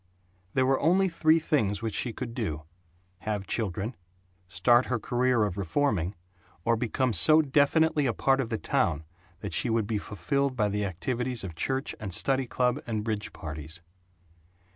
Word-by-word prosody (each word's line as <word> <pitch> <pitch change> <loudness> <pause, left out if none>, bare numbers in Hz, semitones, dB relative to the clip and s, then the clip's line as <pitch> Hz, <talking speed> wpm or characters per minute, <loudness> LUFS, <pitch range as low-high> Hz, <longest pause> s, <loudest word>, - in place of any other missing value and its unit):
There 130 -1 +3
were 135 0 +2
only 185 +5 +3
three 160 -1 +3
things 115 - 0
which 110 -2 -2
she 120 - -1
could 120 0 -6
do: 80 - -3 0.6
Have 105 -2 -3
children; 105 +2 -2 0.5
start 120 +8 +3
her 125 - 0
career 125 0 +1
of 100 -2 -2
reforming; 100 - 0 0.5
or 115 - +3
become 120 +2 0
so 155 - +6
definitely 150 +1 +3
a 120 - +1
part 135 0 +2
of 115 - -4
the 110 - -1
town 95 - 0 0.4
that 100 - -5
she 125 - 0
would 115 -1 +1
be 105 0 -1
fulfilled 130 +9 -1
by 105 -4 +1
the 105 0 -1
activities 125 +6 -2
of 90 -3 -5
church 130 - -2
and 95 -4 -3
study 135 -2 +1
club 125 +3 0
and 110 -2 -2
bridge 110 -2 -2
parties. 80 +2 -7
115 Hz, 165 wpm, -28 LUFS, 100-135 Hz, 0.6 s, so